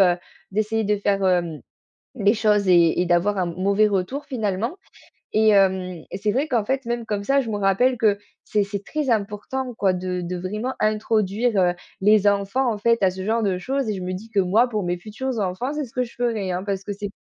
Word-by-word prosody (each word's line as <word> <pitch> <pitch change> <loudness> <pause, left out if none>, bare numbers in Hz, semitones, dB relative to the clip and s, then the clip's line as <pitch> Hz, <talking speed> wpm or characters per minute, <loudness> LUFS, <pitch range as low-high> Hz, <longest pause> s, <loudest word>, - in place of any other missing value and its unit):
heu, - - -16 0.3
d'essayer 215 +2 0
de 210 +1 +1
faire, 200 -1 0
hem, 175 -4 0 0.5
les 205 -3 +3
choses 210 -3 +2
et 170 -1 +5
et - - +1
d'avoir 180 +4 +2
un 180 -2 0
m - - -11
mauvais 200 +3 +3
retour, 205 +8 -2
finalement, 225 - -2 0.6
et 220 0 +4
hem 190 -4 +2
et - - -4
c'est 210 +1 0
vrai 270 +7 0
qu'en 240 -7 +1
fait, 265 +2 -1
même 235 0 -2
comme 210 -2 -2
ça, 275 +3 +3
je 235 - -5
me 210 - -2
rappelle 205 +6 +2
que 215 -3 +3 0.3
c'est 210 -1 +1
c'est 200 0 -5
très 300 -3 -2
important 225 +5 -2
quoi 195 -3 +2
de 180 0 -3
de 180 +1 -4
vraiment 210 +8 -3
introduire, 215 +1 +1
heu, 175 -1 +3 0.3
les 210 +1 +4
enfants 205 +6 +1
en 215 - -3
fait 230 0 +2
à 190 - +4
ce 185 +1 -6
genre 225 +2 +1
de 190 -3 +1
choses 265 +3 -2
et 210 - -1
je 190 - -5
me 180 0 -3
dis 205 +5 -7
que 210 -3 +1
moi, 210 +7 +3
pour 215 -3 -1
mes 175 0 -1
futurs 230 +7 -5
enfants, 200 +8 -2
c'est 300 -1 -2
ce 235 - -18
que 250 - 0
je 240 - -10
ferai, 225 -6 -1
hein. 180 +1 -2
Parce 195 -1 -3
que 205 - -4
c'est, 205 0 -5
210 Hz, 235 wpm, -23 LUFS, 190-230 Hz, 0.6 s, et